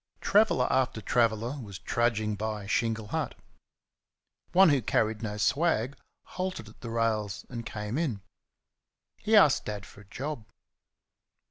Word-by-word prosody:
Traveller 205 -11 +3
after 130 -3 +1
traveller 115 +4 +1
was 100 -4 -8
trudging 110 +1 0
by 105 0 -4
Shingle 115 0 -1
Hut. - - -2 1.2
One 185 +1 +7
who 140 -3 +3
carried 110 0 0
no 105 -2 -4
swag 140 - +1 0.3
halted 185 - -5
at 105 - -16
the 120 - -6
rails 110 -3 -1
and 120 -2 -5
came 105 +5 -3
in. 125 -12 -1 1.0
He 220 +1 +1
asked 170 -10 +6
Dad 105 -1 -5
for 100 - -15
a - - -17
job. 130 +2 -6
115 Hz, 135 wpm, -29 LUFS, 105-135 Hz, 1.2 s, One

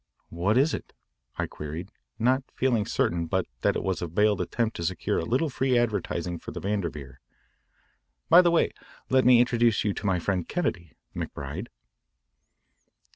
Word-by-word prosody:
"What 95 +7 +1
is 145 +5 +3
it?" - - -6 0.4
I - - 0
queried, 80 +6 -7 0.3
not 125 +4 +2
feeling 120 -5 +1
certain 85 -5 0
but 95 +1 0 0.2
that - - +2
it - - -2
was 95 -2 -1
a 85 - -2
veiled 105 +4 +2
attempt 115 -2 -1
to 85 - -4
secure 85 0 -1
a 80 - -3
little 130 - +1
free 130 -2 +1
advertising 90 -7 -1
for - - -9
the - - -6
Vanderveer. 85 -9 -4 1.1
"By 170 +2 +8
the 175 - +3
way, 170 - +2 0.4
let 130 -1 +4
me 125 -1 +7
introduce 120 -2 +3
you 105 - 0
to 100 - -4
my 95 -2 +2
friend 90 0 -1
Kennedy, 85 - -2 0.2
McBride." 75 - -5
105 Hz, 165 wpm, -27 LUFS, 85-120 Hz, 1.1 s, By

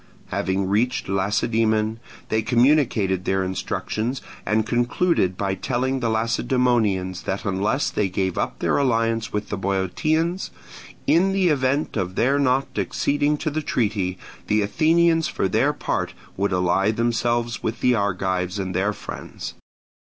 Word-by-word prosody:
Having 95 +2 -1
reached 120 +6 0
Lacedaemon, 110 +3 +1 0.3
they 110 - +1
communicated 120 -6 +2
their 95 0 +1
instructions, 110 +6 -2 0.3
and 110 0 +2
concluded 120 - +1
by 100 -1 -1
telling 130 +7 -1
the 120 -2 0
Lacedaemonians 110 -5 +1
that 100 +4 -3
unless 100 +8 0
they 100 -2 0
gave 95 0 -1
up - - -2
their - - +1
alliance 115 -4 +1
with 105 0 -3
the 105 - -2
Boeotians, 155 - 0 0.6
in 190 +4 +3
the 190 -2 +3
event 140 0 +1
of 95 -2 -2
their 135 +4 +2
not 135 0 +2
acceding 145 +1 +1
to 155 +1 -2
the 155 +2 -1
treaty, 100 -9 -1 0.3
the 105 0 +2
Athenians 165 +8 +3
for - - -1
their - - +2
part - - -3 0.2
would 100 +1 0
ally 90 +2 +2
themselves 120 +1 0
with 110 - -3
the 125 - +4
Argives 95 -3 -1
and 95 -2 -3
their 100 +4 +1
friends. 105 - -7
110 Hz, 140 wpm, -23 LUFS, 95-130 Hz, 0.6 s, the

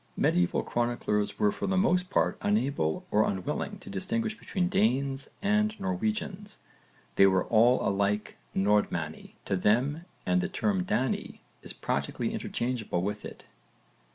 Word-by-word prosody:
Medieval 90 0 +2
chroniclers 120 -3 -1
were 210 0 +3
for 205 - -4
the 190 0 +1
most 180 -1 +2
part - - +2
unable 140 - 0
or 105 +1 +4
unwilling 150 - -2
to 190 - -16
distinguish 215 +3 -2
between 185 -5 -2
Danes 135 - +1
and 215 +1 +2
Norwegians; 205 +1 -3 0.6
they 95 - +8
were 95 -1 +3
all 120 +3 +4
alike 100 +1 0 0.2
'Nordmanni' 95 -6 0
to - - 0
them 125 - +1 0.2
and 185 - +2
the 190 - -2
term 195 -1 0
'Dani' 130 -9 -1 0.2
is - - -7
practically - - -2
interchangeable 120 -7 -2
with 105 +1 -3
it. - - -9
140 Hz, 135 wpm, -29 LUFS, -, 0.6 s, they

